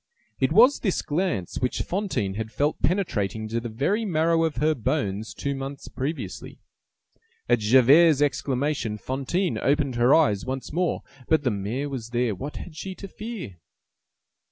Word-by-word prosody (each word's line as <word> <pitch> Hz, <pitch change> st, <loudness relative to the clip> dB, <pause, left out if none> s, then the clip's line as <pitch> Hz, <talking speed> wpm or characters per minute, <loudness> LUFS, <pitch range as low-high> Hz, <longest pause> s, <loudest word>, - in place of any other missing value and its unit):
It 130 Hz, +2 st, +2 dB
was 240 Hz, -, +6 dB
this 195 Hz, -6 st, -1 dB
glance 150 Hz, -, -2 dB
which 125 Hz, -, -1 dB
Fantine 180 Hz, -, -2 dB
had 110 Hz, +2 st, -5 dB
felt 145 Hz, +4 st, -1 dB
penetrating 110 Hz, -, 0 dB
to 115 Hz, +1 st, -1 dB
the 120 Hz, 0 st, -5 dB
very 145 Hz, -, 0 dB
marrow 165 Hz, -3 st, +2 dB
of 160 Hz, -, -2 dB
her 155 Hz, +1 st, +2 dB
bones 105 Hz, -4 st, -2 dB
two 140 Hz, -, -3 dB
months 135 Hz, 0 st, -6 dB
previously. 130 Hz, -, -5 dB, 0.9 s
At 120 Hz, -1 st, +3 dB
Javert's 135 Hz, +8 st, +6 dB
exclamation, 135 Hz, -4 st, 0 dB
Fantine 140 Hz, -, -2 dB
opened 140 Hz, -3 st, +1 dB
her 120 Hz, +4 st, +5 dB
eyes 105 Hz, -11 st, +3 dB
once 130 Hz, +2 st, -5 dB
more. 175 Hz, +1 st, 0 dB, 0.2 s
But 160 Hz, -2 st, +3 dB
the 125 Hz, -, +1 dB
mayor 105 Hz, +8 st, -3 dB
was 120 Hz, -5 st, -5 dB
there; 120 Hz, -2 st, 0 dB
what 140 Hz, +11 st, -6 dB
had 165 Hz, -, -8 dB
she 190 Hz, +4 st, -6 dB
to 195 Hz, -, -8 dB
fear? 200 Hz, -, -7 dB
135 Hz, 155 wpm, -25 LUFS, 115-165 Hz, 0.9 s, was